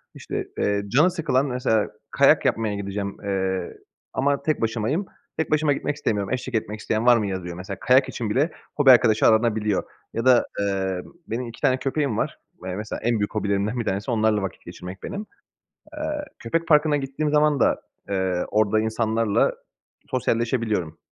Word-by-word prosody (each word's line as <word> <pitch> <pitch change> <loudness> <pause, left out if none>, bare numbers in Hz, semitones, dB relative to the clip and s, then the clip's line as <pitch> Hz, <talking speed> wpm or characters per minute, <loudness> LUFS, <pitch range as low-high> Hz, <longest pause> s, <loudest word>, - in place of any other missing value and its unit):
İşte, - - -5
eee, 100 0 +1
canı 150 - +4
sıkılan 150 -6 +1
mesela 125 -5 +1 0.2
kayak - - +4
yapmaya 110 -2 +1
gideceğim, 100 0 -4
eee, 95 -1 -2 0.4
ama 140 +1 +1
tek 155 -3 0
başımayım. 115 - 0 0.3
Tek 160 - -1
başıma 155 -1 +3
gitmek 145 - -2
istemiyorum. 105 -7 -1
"Eşlik 125 -1 -3
etmek 110 -1 -2
isteyen 110 +1 -1
var 120 -1 +7
mı?" 105 -3 -1
yazıyor, 90 -3 -4
mesela 95 +1 -6
kayak 130 +2 +4
için 115 -4 -3
bile 140 +10 +1 0.2
hobi 140 -3 +7
arkadaşı 110 -3 +5
aranabiliyor 110 -3 +2 0.3
ya 115 +2 -2
da, 125 -2 +6
eee, 95 -2 -1 0.3
benim 120 +2 -3
2 115 - -11
tane 130 - +3
köpeğim 135 -3 -1
var. - - -2 0.3
Eee, 90 -1 -3
mesela 105 +2 -5
en 115 -1 +1
büyük 105 +1 -2
hobilerimden 100 +3 0
1 115 - -2
tanesi 100 +6 -2
onlarla 110 -2 +2
vakit 95 -4 -6
geçirmek 90 +2 -9
benim. 200 +2 -5 0.7
Eee, 300 - -8 0.4
köpek 165 +9 -1
parkına 150 -1 +4
gittiğim 140 +2 -2
zaman 150 -1 +3
da, - - +2 0.3
eee, 95 -2 0
orada 110 0 +3
insanlarla 110 -1 +1 0.6
sosyalleşebiliyorum. 115 -8 0
110 Hz, 165 wpm, -24 LUFS, 100-135 Hz, 0.7 s, var